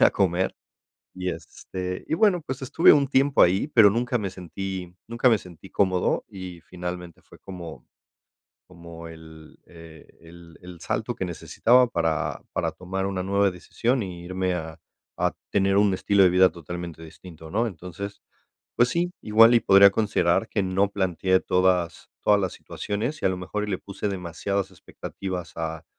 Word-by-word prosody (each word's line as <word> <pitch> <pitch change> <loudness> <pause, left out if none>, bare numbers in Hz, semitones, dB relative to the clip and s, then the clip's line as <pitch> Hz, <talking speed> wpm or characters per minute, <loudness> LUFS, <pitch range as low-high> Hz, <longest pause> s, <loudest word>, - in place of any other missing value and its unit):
salir - - +1
a - - +6
comer, 95 -1 0 0.6
y, 90 0 -3
este, 90 +3 -6
y - - +1
bueno, 180 -2 +3
pues, 130 0 -4
estuve 145 +5 +5
un 140 -2 +3
tiempo 135 +1 +3
ahí, 95 - +3
pero, 110 -7 +7
nunca 120 +3 0
me 100 - -3
sentí 95 0 -6
nunca 120 +2 +2
me 110 - +4
sentí 90 -5 -14
cómodo 95 -2 +1
y 90 -3 -9
finalmente 90 -1 -7
fue - - -18
como 85 -9 -10 0.8
como 85 -1 -11
el 80 -1 -14
el 80 -2 -14 0.2
el 85 0 -15
el 90 -1 -11
salto - - -2
que - - -3
necesitaba 125 +2 +3
para 80 -8 -1
para - - -1
tomar 95 +1 -4
una 95 -2 -2
nueva 100 +1 +2
decisión 115 +7 -1
y 90 -3 -7
irme 90 0 -1
a 80 -1 -6 0.4
a - - +1 0.2
tener 95 -1 +2
un 100 -1 +4
estilo 100 +1 +3
de 90 - +5
vida 90 +1 +6
totalmente 85 0 -8
distinto, 80 0 -12
¿no?, 115 +6 +1
entonces, 90 +3 -8 0.5
pues 120 +1 +4
sí, 175 +4 0
igual 115 +2 +6
y 115 - +4
podría 100 +1 +7
considerar 100 -2 +1
que 100 - 0
no 95 +2 +1
planteé 95 -1 +1
todas 90 -3 0
todas 105 -1 +4
las 95 - -1
situaciones 115 +9 -4
y - - -2
a - - +4
lo 95 - -2
mejor, 105 +3 -4
le 95 - -1
puse 100 +1 -5
demasiadas 95 +1 -3
expectativas 95 -3 -7
a 80 0 -4
95 Hz, 170 wpm, -25 LUFS, 85-100 Hz, 0.8 s, pero